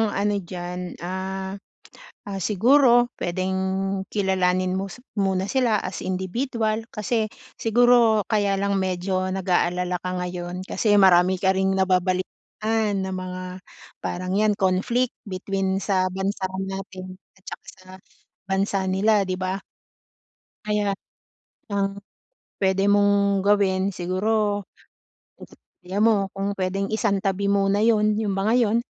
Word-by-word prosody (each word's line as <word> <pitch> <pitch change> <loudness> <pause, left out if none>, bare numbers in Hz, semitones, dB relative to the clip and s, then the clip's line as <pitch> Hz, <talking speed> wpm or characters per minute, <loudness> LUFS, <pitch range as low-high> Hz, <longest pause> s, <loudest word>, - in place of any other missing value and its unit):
ano 205 +1 +1
diyan, 180 0 -6
ah, 190 +1 -4 0.8
ah, 195 -1 -4
siguro 240 - +4
puwedeng 185 +2 -1 0.5
kilalanin 185 -2 +1
mo 195 - -2
si 245 - -12 0.2
muna 190 -1 +1
sila 240 -6 +2
as 185 - -5
individual. 220 +4 -2
Kasi 215 +1 0 0.3
siguro 235 -1 +4
kaya 205 -2 +2
lang 200 0 0
medyo 185 0 -1
nag-aalala 180 -1 0
ka 185 - -4
ngayon 180 0 -5
kasi 205 +1 +1
marami 185 -1 +5
ka 190 - +4
ring 190 0 +1
nababalitaan 190 +3 0
na 190 - -4
mga 185 0 -5 0.6
parang 185 +1 -4
yan 215 -1 +3
conflict 200 +7 +1 0.2
between 190 0 -2
sa 185 -2 +1
bansa 190 +1 -2 0.2
natin 185 -1 -7 0.2
at 190 - -26
saka - - -9
sa 185 -1 -20 0.6
bansa 195 +1 0
nila 200 +1 +2
di 185 - 0
ba? 185 +1 -2 1.1
Kaya 210 -2 0 0.8
ang 195 0 0 0.6
puwede 195 +1 +2
mong 200 -1 +3
gawin, 195 -2 +2
siguro 205 +2 0 0.7
ang - - -13 0.3
idea 185 +3 -4
mo 210 -3 +3
kung 195 +1 -3
puwedeng 195 +1 -1
isang 205 -3 +1
tabi 195 +1 0
muna 200 +1 +2
'yon 215 -2 +3
yung 215 -1 -1
mga 195 +4 +1
yon. 225 +1 +2
195 Hz, 125 wpm, -24 LUFS, 185-210 Hz, 1.1 s, marami